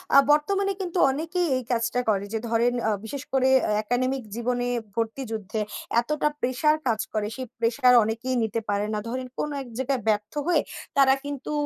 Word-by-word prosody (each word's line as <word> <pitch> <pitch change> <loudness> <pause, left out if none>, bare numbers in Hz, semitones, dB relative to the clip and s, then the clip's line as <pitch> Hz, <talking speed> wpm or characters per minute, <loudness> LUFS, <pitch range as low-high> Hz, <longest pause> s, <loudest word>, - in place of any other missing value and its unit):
আ - - +10
বর্তমানে 390 +7 +2
কিন্তু 360 -1 -3
অনেকেই 330 +5 -1
এই 255 - -4
কাজটা 230 +1 +1
করে 200 -1 +1
যে 225 - 0
ধরেন 235 +2 +2
আ - - +3
বিশেষ 280 +4 -5
করে, 265 -1 +3
অ্যা - - 0
একাডেমিক 255 +3 0
জীবনে 245 +1 -1 0.3
ভর্তি 230 +4 -2
যুদ্ধে, 215 0 -3 0.4
এতটা 300 +4 0
প্রেশার 295 +5 +2
কাজ 225 -2 +1
করে, 215 -1 0
সেই 260 -1 -5
প্রেশার 250 +2 +4
অনেকেই 230 +4 -2
নিতে 220 +1 -1
পারে 205 0 +1
না। 210 - 0
ধরেন 255 +1 -3
কোন 300 - -1
এক 265 - -9
জায়গায় 260 -1 -1
ব্যর্থ 210 0 +1
হয়ে, 355 - +4 0.4
তারা 270 -1 +6
কিন্তু 285 0 -5
250 Hz, 180 wpm, -25 LUFS, 225-275 Hz, 0.4 s, আ